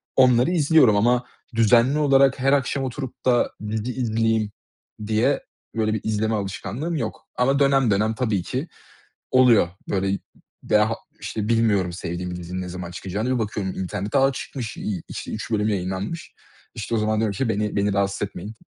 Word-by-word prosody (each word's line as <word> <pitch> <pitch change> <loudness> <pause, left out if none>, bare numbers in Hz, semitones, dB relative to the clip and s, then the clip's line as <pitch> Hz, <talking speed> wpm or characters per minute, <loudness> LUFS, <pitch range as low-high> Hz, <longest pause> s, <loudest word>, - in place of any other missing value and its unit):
onları 125 +3 +5
izliyorum 150 - +5
ama 120 +3 +3 0.3
düzenli 115 +5 +4
olarak 135 -2 +4
her 135 +2 +3
akşam 140 0 +1
oturup 130 0 -6
da 125 -2 +3 0.2
dizi 110 +3 -2
izleyeyim 110 -3 0 0.6
diye 115 +6 +2 0.3
böyle 110 -1 +1
bir 110 - -2
izleme 110 0 0
alışkanlığım 105 - -3
yok 115 -8 -4
ama 135 +3 +2
dönem 135 -4 +4
dönem 105 +3 +2
tabii 110 -7 0
ki 130 - -3 0.6
oluyor. 125 -8 +5 0.2
Böyle, 95 0 0 0.5
veya 105 +1 +3
ha 115 - -1 0.3
işte, 105 -2 -3
bilmiyorum 105 -6 +2
sevdiğim 90 +1 -4
dizinin 90 +1 -5
ne 90 - -5
zaman 90 -1 -6
çıkacağını. 100 +7 -2
Bir - - -1
bakıyorum 105 -3 -2
internete; 100 +7 -2
"A, 135 +1 +4
çıkmış." 125 -3 -6
İ 95 -5 -4
işte, - - -6
3 110 +2 -5
bölüm 105 -1 +1
yayınlanmış. 95 - -3 0.4
İşte 110 +1 -3
o - - +2
zaman 110 0 +1
diyorum 110 -2 0
ki 115 +4 -1
beni 105 -1 -1
beni 100 0 +1
rahatsız 100 0 0
etmeyin. 100 +2 -8
110 Hz, 165 wpm, -23 LUFS, 100-125 Hz, 0.6 s, onları